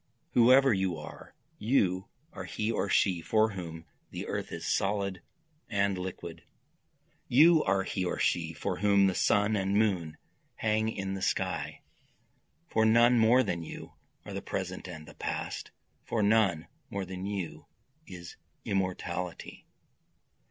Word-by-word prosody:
Whoever 130 +2 +6
you 95 -4 0
are! 75 - -11 0.2
you 95 -6 +1 0.3
are - - -6
he 110 +1 -2
or 100 - -1
she 90 -3 +2
for 110 +5 +2
whom 85 -4 -7 0.2
the - - -6
earth - - -4
is - - -6
solid 100 -2 0 0.5
and 100 -2 +1
liquid, 90 -3 -7 0.8
You 155 +5 +6
are 95 0 +2
he 95 0 -2
or 90 - -2
she - - 0
for - - -3
whom 100 0 +4
the 95 - +2
sun 105 +3 +2
and 100 0 0
moon 90 -8 0 0.4
hang 110 0 +1
in 95 -3 -4
the 95 - -5
sky, - - -2 0.9
For 110 -8 +1
none 120 +2 +5
more 120 +4 +5
than 85 -7 -2
you 80 - -9 0.3
are - - -7
the - - -4
present - - -4
and 75 0 -9
the - - -12
past, - - -4 0.3
For 110 -2 -1
none 100 -6 +3 0.2
more 100 -1 -3
than 95 +1 -6
you 95 -5 -5 0.4
is 90 -2 -10 0.3
immortality. 90 -2 -3
100 Hz, 145 wpm, -30 LUFS, 90-110 Hz, 0.9 s, Whoever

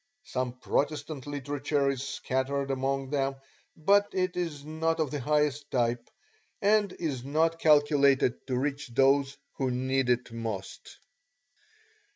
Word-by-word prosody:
Some 125 -1 -3
Protestant 145 +2 -2
literature 145 0 -1
is 135 -2 -4
scattered 135 0 -2
among 135 0 -1
them 135 -1 0 0.4
but 200 +6 +4
it 185 -1 0
is 160 -5 -3
not 160 +1 -1
of 155 -4 0
the 145 - -2
highest 150 +1 0
type, 120 -1 0 0.5
and 205 -1 +3
is 140 -7 -3
not 160 +4 +1
calculated 145 -5 +3
to 130 -2 -1
reach 140 +2 -2
those 135 +2 +2 0.2
who 135 -1 0
need 130 +1 0
it 125 0 +1
most. 110 -4 -6
140 Hz, 130 wpm, -29 LUFS, 130-150 Hz, 0.5 s, but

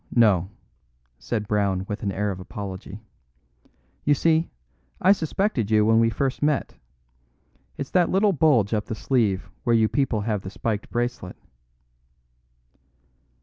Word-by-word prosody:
"No, 110 -6 +5
no," 95 - -9 0.7
said 105 -3 -3
Brown 100 -3 0
with 105 - -5
an 100 - -1
air 105 +1 -1
of 95 - -6
apology. 100 +2 -8 1.0
"You 145 - +3
see, 160 +3 +2 0.5
I 190 - +5
suspected 165 - 0
you 105 -1 +4
when 110 +1 +4
we 115 0 +4
first 130 +4 -2
met. 145 -1 0 1.0
It's 140 - -5
that 180 -2 +3
little 200 +1 +3
bulge 135 - +3
up 105 -1 0
the 110 - -5
sleeve 110 -6 0
where 120 - +3
you 110 -1 +4
people 130 -4 0
have 105 -2 -2
the 95 - -7
spiked 105 +1 -3
bracelet." 120 -6 -3
110 Hz, 145 wpm, -24 LUFS, 100-140 Hz, 1.0 s, No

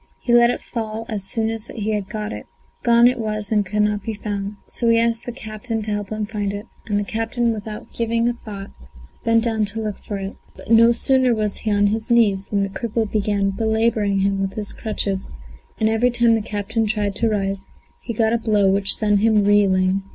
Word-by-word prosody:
He 240 - 0
let 240 0 +6
it - - -2
fall 225 -1 -5
as 210 -4 -3
soon 220 +3 -1
as 225 0 -5
he 210 -1 -2
got 210 +2 -5
it; - - -8 0.3
gone 235 0 +5
it 250 0 +1
was 215 -2 -3
and 210 -1 +3
could 210 +2 0
not 210 0 0
be 220 +2 -4
found. 205 -1 -4
So 235 - -1
he 230 - +5
asked 230 0 0
the - - -2
captain 225 -1 -5
to 215 - -4
help 205 -1 -3
him 215 -1 -2
to 215 - -16
find 205 -2 -1
it, 205 +2 -6 0.2
and 205 -2 +1
the - - -1
captain, 225 +3 -1
without 215 -1 -7
giving 230 0 0
a 240 - +1
thought, 205 -4 -9 0.5
bent 230 0 +3
down 220 -2 +1
to 205 +2 -4
look 215 -2 -4
for 205 - -5
it. 195 0 -6 0.2
But - - -9
no 230 +1 +7
sooner 255 0 +3
was 210 -2 -1
he 220 - -2
on 205 0 +3
his 220 +3 -1
knees 210 -5 +3
than 200 -1 0
the 195 - -2
cripple 225 +1 -2
began 205 -2 +1
belabouring 220 -1 +1
him 195 0 +1
with 195 0 -2
his 210 -2 -1
crutches, 200 -3 -2 0.5
and 220 - +3
every 225 +3 +3
time 240 -1 +4
the 225 - +2
captain 215 +1 -2
tried 205 -1 0
to 230 - +2
rise, 195 -2 -2 0.3
he 235 - -5
got 225 0 +1
a 235 - +2
blow 210 -3 +3
which 195 0 +3
sent 210 -2 +2
him 215 -1 +3
reeling. 195 -2 +3
215 Hz, 225 wpm, -21 LUFS, 205-230 Hz, 0.5 s, no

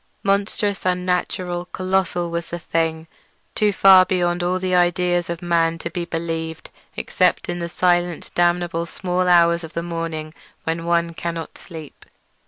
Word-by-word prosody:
Monstrous, 200 0 0
unnatural, 180 -1 -1
colossal, 185 -2 -1
was 170 0 -3
the 175 - -4
thing—too 165 +5 -2
far 190 -1 +7
beyond 175 -1 0
all 180 +1 +1
the 185 0 -2
ideas 175 0 +2
of 170 +1 -4
man 165 -1 +2
to 170 - -6
be 175 -1 -3
believed 165 -1 -4 0.3
except - - +1
in 175 0 -3
the 170 0 -4
silent 175 -1 0
damnable 175 -1 +1
small 180 +1 -1
hours 170 -1 +5
when 165 0 -5
one 170 0 +1
cannot 165 -1 -5
sleep. 160 -5 -11
175 Hz, 130 wpm, -21 LUFS, 165-180 Hz, 0.3 s, far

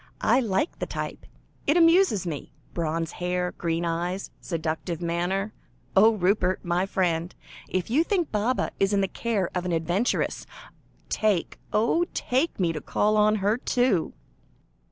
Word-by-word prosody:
"I 250 - +4
like 225 - -1
the - - -2
type; - - -5 0.4
it 295 +4 +4
amuses 330 - +5
me. 155 -5 -5 0.2
Bronze 165 -1 -1
hair, 180 0 -2
green 165 0 -2
eyes, 175 +3 -2
seductive 160 0 -3
manner. 175 +4 -1 0.4
Oh! 220 +3 +6
Rupert, 185 -1 +1
my 175 +2 +1
friend, 175 -3 0 0.3
if 185 +3 -2
you 300 +7 +4
think 350 -3 0
Baba 220 +4 0
is 195 +1 +2
in 200 - +3
the 195 - +1
care 205 -3 -1
of 180 - -1
an 180 -1 -1
adventuress, 175 +9 0 0.6
take, 210 -5 0
oh 235 +11 +2
take 265 +3 0
me 170 -3 +1
to 155 - -5
call 210 +1 +1
on 215 0 +4
her 210 +3 +3
too!" 245 -9 +1
190 Hz, 150 wpm, -26 LUFS, 175-220 Hz, 0.6 s, Oh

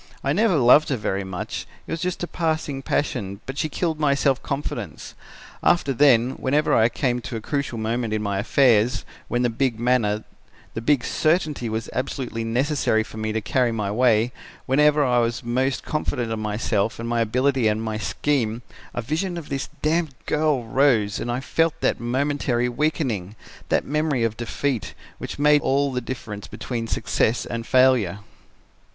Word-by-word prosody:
I 140 - +1
never 205 +1 +3
loved 140 +2 +6
her 135 - 0
very 100 -2 -2
much, 95 -2 -5 0.2
it - - -9
was 165 - -3
just 180 -1 -2
a - - -2
passing 160 -5 -2
passion, 100 -9 -2
but 135 +2 -5
she 155 - 0
killed 160 0 -2
my 145 -2 +3
self 135 -2 +1
confidence. 140 0 -5 0.5
After 145 -6 +2
then, 125 -2 +4
whenever 150 +4 +1
I 115 +1 +5
came 125 0 -1
to 125 0 -6
a - - -2
crucial 140 +1 -3
moment 115 +1 -1
in 110 0 -1
my 100 -1 -1
affairs, 120 0 +3 0.2
when 120 0 0
the 120 - +2
big 120 -1 0
manner, 115 -3 +1 0.5
the 115 - -4
big 135 0 +2
certainty 155 -6 0
was 110 +1 -3
absolutely 125 -3 -3
necessary 120 -1 +1
for 110 - -11
me 110 0 -2
to 110 +1 -1
carry 125 +3 +1
my 105 -3 -2
way, 115 0 +3 0.3
whenever 150 +2 +4
I 125 -1 +3
was 115 +1 -1
most 130 +3 0
confident 125 -6 -2
of 110 - -2
myself 105 0 -1
and 115 - -5
my 120 0 +1
ability 125 +2 +2
and 105 0 +1
my 110 -1 -3
scheme, 120 -2 -1 0.3
a 120 - -2
vision 170 +8 -2
of 165 -3 -7
this 135 -1 -3
damned 155 -2 +1
girl 150 -4 +1
rose 115 -4 +2
and 120 - -3
I 125 +2 -2
felt 165 +3 0
that - - +1
momentary 125 0 0
weakening, 120 - -1 0.3
that - - +2
memory 150 -4 0
of 115 -1 0
defeat, 120 +1 -3 0.2
which - - -6
made 150 0 +5
all 140 +1 +1
the 125 -1 -2
difference 110 -4 -6
between 115 -2 -4
success 115 +1 0
and 115 -1 -5
failure. 125 -7 +3
125 Hz, 175 wpm, -23 LUFS, 115-145 Hz, 0.5 s, loved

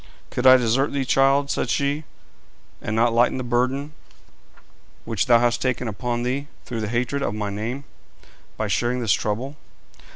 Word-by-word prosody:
'Could 125 +1 +1
I 130 0 +10
desert 125 +4 +1
thee, 135 -1 -1
child,' 135 +2 +3
said - - -1
she, 145 +2 0 0.8
'and 105 - -3
not 115 +1 +3
lighten 120 +2 +3
the 130 - -3
burden 130 +5 -1 1.1
which 115 -4 -1
thou 120 -2 +7
hast 120 0 +1
taken 125 -1 -1
upon 120 +3 -2
thee 135 +3 -2 0.2
through 115 -2 -4
the 110 - -2
hatred 125 +5 -1
of 105 -6 -1
my 105 -1 -3
name, 115 +7 -4 0.7
by - - -1
sharing 120 +1 0
this 115 -4 +2
trouble? 125 +8 -2
125 Hz, 165 wpm, -23 LUFS, 115-135 Hz, 1.1 s, I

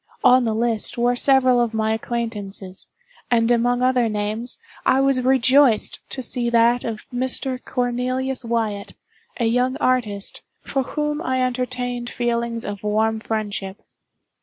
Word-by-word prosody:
On 250 0 +6
the 220 -1 0
list 230 -1 -1
were 240 +1 +2
several 255 -1 +4
of 230 -2 -1
my 220 0 +1
acquaintances, 210 -5 -4 0.4
and 230 -1 +2
among 245 +1 +2
other 250 -2 +2
names, 215 +3 -2 0.3
I 260 +1 +3
was 270 -1 +2
rejoiced 260 -1 +3
to 260 - -2
see 240 0 +1
that 235 +1 +3
of 220 -2 -5
Mr. 255 +1 0
Cornelius 255 +1 -2
Wyatt, 225 -3 -2 0.4
a 235 - +1
young 250 +3 +1
artist, 220 -6 -1 0.2
for 270 - -1
whom 300 +3 -2
I 260 -5 0
entertained 250 -1 -3
feelings 235 -1 -2
of 205 -1 -5
warm 220 +1 0
friendship. 205 -3 -4
240 Hz, 135 wpm, -22 LUFS, 220-255 Hz, 0.4 s, On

